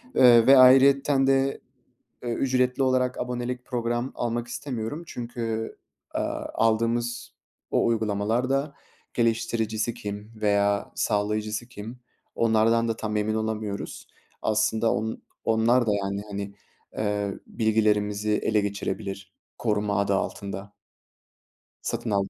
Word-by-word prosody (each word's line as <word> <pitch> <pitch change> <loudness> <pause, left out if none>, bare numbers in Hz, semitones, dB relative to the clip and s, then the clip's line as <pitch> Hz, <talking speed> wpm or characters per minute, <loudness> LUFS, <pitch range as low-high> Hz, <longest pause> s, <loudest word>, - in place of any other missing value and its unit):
Iıı, 120 -2 +7
ve 135 0 +9
ayrıyeten 135 +1 +6
de, 135 0 +2 0.6
ööö, 120 -1 -2
ücretli 130 0 +1
olarak 130 -1 +1
abonelik 125 0 -3
program 120 +1 -2
almak 120 0 -2
istemiyorum 120 +3 -4
çünkü, 115 -4 -4 0.4
aaa, - - -2
aldığımız 115 +2 0 0.4
o - - +2
uygulamalar 110 +2 0
da 140 +2 0 0.4
geliştiricisi 115 -1 0
kim 105 +1 -7
veya 100 -1 +1
sağlayıcısı 105 +2 -1
kim, 120 +1 -9 0.3
onlardan 115 +1 +3
da 115 - -1
tam 110 -1 -3
emin 105 +1 0
olamıyoruz. 110 -2 -3 0.4
Aslında 110 +1 +2
on 110 +1 -3 0.2
onlar 115 +2 +3
da, - - +2
yani, 100 +1 -3
hani, 100 0 -5 0.4
eee, 105 -2 -1
bilgilerimizi 105 -2 +1
ele 105 0 +2
geçirebilir 100 -1 -4 0.2
"koruma" 105 -2 0
adı 100 0 +1
altında. 100 +1 -4 1.1
Satın - - -2
aldım. 100 -1 +1
110 Hz, 115 wpm, -26 LUFS, 105-120 Hz, 1.1 s, ve